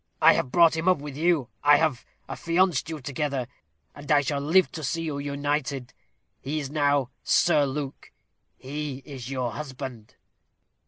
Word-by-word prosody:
I - - +7
have 125 - -1
brought 170 0 +5
him 160 +2 -2
up 185 - +5
with 145 -1 -8
you. 155 -5 +1
I 145 0 +7
have 155 -5 0 0.2
affianced 170 -2 +1
you 155 -2 -5
together; 135 -1 -2 0.5
and 145 +1 -7
I 145 -1 +6
shall 145 0 -1
live 170 +6 +3
to 155 - -7
see 165 +4 -2
you 150 -3 -3
united. 140 -2 -2 0.5
He 150 +3 -3
is 140 -2 -5
now 145 -3 +1
Sir 150 -5 +3
Luke. 140 0 -6 0.5
He 140 0 -5
is 130 -4 -8
your 130 -3 -2
husband." 130 -3 -7
145 Hz, 160 wpm, -26 LUFS, 135-155 Hz, 0.5 s, I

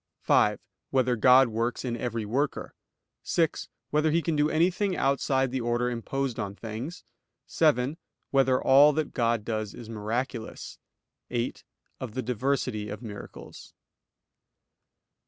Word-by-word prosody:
(5) - - +3 0.3
Whether 130 -2 +2
God 125 +2 +6
works 115 +3 -2
in 120 -2 -2
every 115 -2 -3
worker? 135 +7 -2 0.5
(6) 165 -3 0 0.2
Whether 150 +1 +2
He 165 +2 +1
can 165 - 0
do 150 +1 +2
anything 180 +4 +1
outside 135 -1 +1
the 130 -1 -2
order 120 +1 0
imposed 130 +2 -3
on 100 0 -4
things? 115 - -6 0.4
(7) 150 -2 +2 0.3
Whether 135 -2 +3
all 145 +3 +6
that 155 0 -2
God 115 -3 0
does 110 -2 -3
is 115 -2 -10
miraculous? 115 +2 -4 0.5
(8) 120 0 -3 0.4
Of 120 -4 -6
the 130 - -2
diversity 125 -3 -1
of 105 +4 -7
miracles. 105 -3 -10
125 Hz, 130 wpm, -27 LUFS, 115-140 Hz, 0.5 s, God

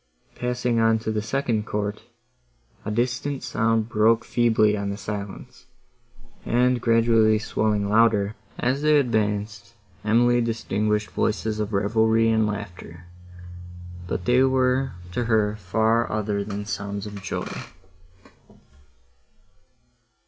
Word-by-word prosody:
Passing 125 -1 -1
on 115 0 +4
to 110 - 0
the 110 -1 -1
second 110 -2 -1
court, 105 0 -3 0.8
a - - -4
distant 125 +5 -2
sound 115 -1 0
broke 115 +1 +2
feebly 110 -3 +2
on 100 -1 -3
the 100 - -4
silence, 100 -1 -7 0.8
and 125 0 +2
gradually 115 -2 +4
swelling 105 -1 -1
louder, 105 -1 +3 0.2
as 130 +3 0
they 150 0 +4
advanced, 105 -4 -1 0.3
Emily 120 +3 +3
distinguished 105 -3 -1
voices 110 0 -1
of 105 0 -2
revelry 110 +2 +2
and 110 -1 +2
laughter, 90 -5 -7 1.0
but 90 0 -3
they 125 +1 +4
were 130 0 +2 0.2
to 120 +6 -2
her 110 -2 +1
far 110 +4 +1
other 105 -1 -1
than 100 0 -5
sounds 100 -1 -4
of 105 -1 -8
joy. 95 - -4
110 Hz, 115 wpm, -24 LUFS, 105-115 Hz, 1.0 s, on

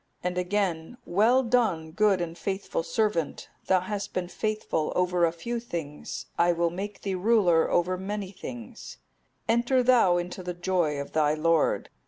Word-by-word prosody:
'(259) 180 - +1
And 180 - -2
again, 190 0 -1
'Well 225 +8 +3
done, 220 -10 +1
good 200 0 +2
and 170 -1 -4
faithful 190 -1 -3
servant; 205 -4 -1 0.2
thou 185 -1 +4
hast 200 +2 -4
been 180 -1 -2
faithful 215 -5 -2
over 180 -1 +2
a 165 - +1
few 235 +9 -4
things, 165 -10 -6
I 175 0 +4
will 170 0 0
make 195 +3 -6
thee 195 - -1
ruler 185 -4 +3
over 180 +1 +1
many 200 0 -4
things; 235 +3 -9 0.5
enter 240 +3 +2
thou 235 -8 +5
into 175 +1 -4
the 180 -1 -5
joy 175 -5 0
of 140 - -6
thy 150 -1 +2
Lord. 165 0 +1
185 Hz, 165 wpm, -27 LUFS, 170-215 Hz, 0.5 s, thou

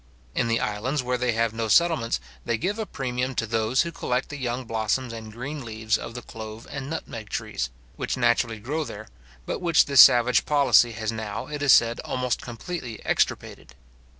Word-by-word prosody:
In 125 - 0
the 115 0 +1
islands 125 +7 -1
where 125 0 -1
they 125 -1 +1
have 115 0 0
no 115 0 -2
settlements, 160 -3 +3 0.2
they 115 - 0
give 195 - -2
a 220 - -3
premium 130 -3 -3
to 115 - 0
those 115 +4 +1
who 170 - -5
collect 125 -5 -2
the 145 - -6
young 125 -1 -3
blossoms 115 +2 -1
and 110 -1 -8
green 135 +5 -6
leaves 110 -1 -1
of 115 - -5
the 120 - -6
clove 110 0 -9
and 140 -1 -5
nutmeg 115 -9 -6
trees, - - -3 0.3
which - - -2
naturally 120 -2 +2
grow 145 +9 -3
there, 110 -6 -9 0.4
but - - -3
which 170 -3 +4
this 140 -2 +8
savage 120 0 +6
policy 140 -5 +5
has 110 0 -3
now, 110 -1 -5
it 150 -1 -6
is 145 -2 +5
said, 115 -1 +5
almost 125 -1 -2
completely 120 0 -6
extirpated. - - -1
120 Hz, 190 wpm, -25 LUFS, 110-135 Hz, 0.4 s, this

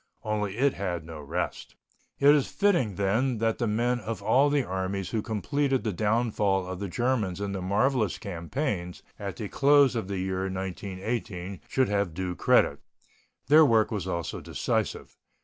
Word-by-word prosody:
Only 105 -1 -2
it 140 +2 +3
had 90 -4 -3
no 80 -2 -8
rest. 85 +5 -4 0.4
It 145 +1 +6
is 145 -3 +2
fitting, 175 - +1
then, 110 +7 +1
that 115 0 0
the 120 - 0
men 120 +3 +1
of 110 -2 -5
all 140 +7 +4
the 145 -1 +2
armies 95 -1 -3
who 110 - 0
completed 135 +5 -1
the 110 -3 -1
downfall 105 -2 +1
of 90 0 -6
the 100 - -3
Germans 110 -3 -1
in 100 -1 -3
the 95 -1 -4
marvellous 105 +4 +1
campaigns 90 - -4 0.2
at 100 -2 -5
the 110 - -5
close 140 +1 +4
of 110 -5 -2
the 100 -1 -3
year 95 +1 -2
1918 95 0 -4
should 130 -3 +1
have 100 -5 0
due 90 0 -2
credit. - - +3 0.7
Their 155 +4 +7
work 115 -6 +3
was 100 -4 -3
also 85 -2 -3
decisive. - - -2
105 Hz, 165 wpm, -27 LUFS, 95-125 Hz, 0.7 s, Their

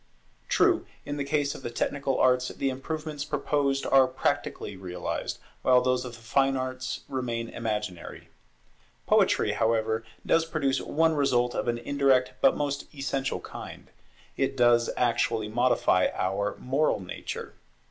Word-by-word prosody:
True, - - +3 0.2
in 145 - -4
the 140 - -1
case 140 0 0
of - - -10
the - - -4
technical 135 +3 -1
arts 125 0 +3
the 135 +1 -2
improvements 150 +2 -4
proposed 145 -2 0
are 135 -1 +5
practically 130 -5 -2
realized, 90 -1 -4 0.2
while 125 -1 +5
those 125 0 0
of 125 - -7
the 115 - -16
fine 135 +4 +2
arts 130 0 -4
remain 120 -3 -3
imaginary. 105 -6 -5 0.8
Poetry, - - +3
however, 110 0 +1 0.2
does 165 0 +3
produce 140 -5 0
one 160 +1 +2
result 125 -5 +2
of - - -2
an 120 0 +1
indirect 135 0 +2
but 135 - +5
most 140 -1 -2
essential 135 -1 -2
kind; - - -10 0.5
it 135 0 0
does 120 -1 +4
actually 115 -2 +1
modify 120 -5 +3
our 100 +2 -1
moral 135 +2 +1
nature. 90 -2 -6
130 Hz, 140 wpm, -27 LUFS, 115-140 Hz, 0.8 s, are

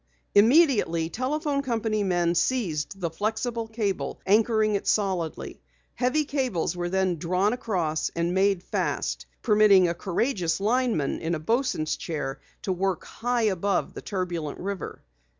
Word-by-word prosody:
Immediately 210 - +4
telephone 280 +3 -1
company 225 -5 -1
men 175 -3 +1
seized 175 -3 -1
the 170 -3 -2
flexible 225 +5 -2
cable, 220 -3 -2
anchoring 215 +1 +3
it 200 - -2
solidly. 185 -7 -1 0.3
Heavy 260 +5 +1
cables 255 - -1
then 180 +2 0
were 175 - -1
drawn 185 +6 +1
across 180 -10 -1
and 170 +1 0
made 190 -1 +2
fast, - - -2 0.2
permitting 210 -3 +6
a 170 - 0
courageous 185 0 -1
lineman 220 - +1
in 170 +1 -1
a - - -4
bosun's 225 - 0
chair 150 -4 -4 0.2
to 190 - 0
work 185 -1 -1
high 245 0 -1
above 195 -2 0
the - - -7
turbulent 175 -6 -3
river. 195 -2 -5
195 Hz, 135 wpm, -26 LUFS, 170-230 Hz, 0.3 s, permitting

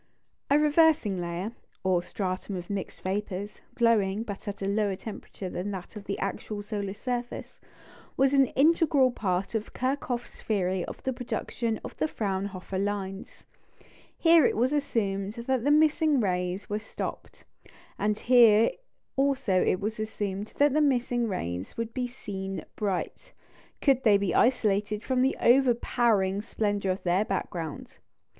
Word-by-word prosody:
A 285 - +5
"reversing 300 - +3
layer," 175 +5 -3 0.3
or 185 -2 +2
stratum 185 +1 -4
of 175 +1 -6
mixed 200 -2 -5
vapours, 200 +1 -3
glowing, 220 -3 +2
but 205 -2 -7
at 200 -1 -4
a - - -1
lower 200 -1 +1
temperature 200 -1 -8
than 180 +2 -4
that 190 +1 -7
of 205 -1 -8
the 200 - -3
actual 205 +1 -4
solar 205 -2 -4
surface, 245 +2 -5 0.6
was 270 +1 +3
an 275 -2 +5
integral 290 -3 +4
part 190 -4 -2
of 220 -1 -3
Kirchhoff's 255 -2 -3
theory 190 -4 0
of - - -9
the 260 - -1
production 235 -2 -3
of - - -8
the - - +1
Fraunhofer 195 -5 -3
lines. 195 -1 -4 0.7
Here 330 -2 +6
it - - +2
was 250 +5 +2
assumed 205 -9 -1
that 240 +1 -1
the 285 - +2
missing 305 -1 +4
rays 180 -2 -1
were 210 +1 -2
stopped, 215 - -7 0.5
and 210 0 +1
here 230 -2 +6 0.4
also 270 -9 +2
it 185 - +2
was 215 +2 -3
assumed 205 -2 -4
that 290 -1 +4
the 305 - +3
missing 245 -4 +1
rays 90 - -4
would 230 0 -3
be 250 -1 -1
seen 195 -6 -6
bright, 200 -4 -3 0.5
could 270 -3 +4
they 210 -3 +6
be 200 -3 -1
isolated 210 -3 +2
from 255 -1 +1
the 265 +2 +2
overpowering 235 -5 +3
splendour 205 -3 -1
of 185 - -4
their 180 +3 +2
background. 170 -6 -4
210 Hz, 150 wpm, -28 LUFS, 195-250 Hz, 0.7 s, Here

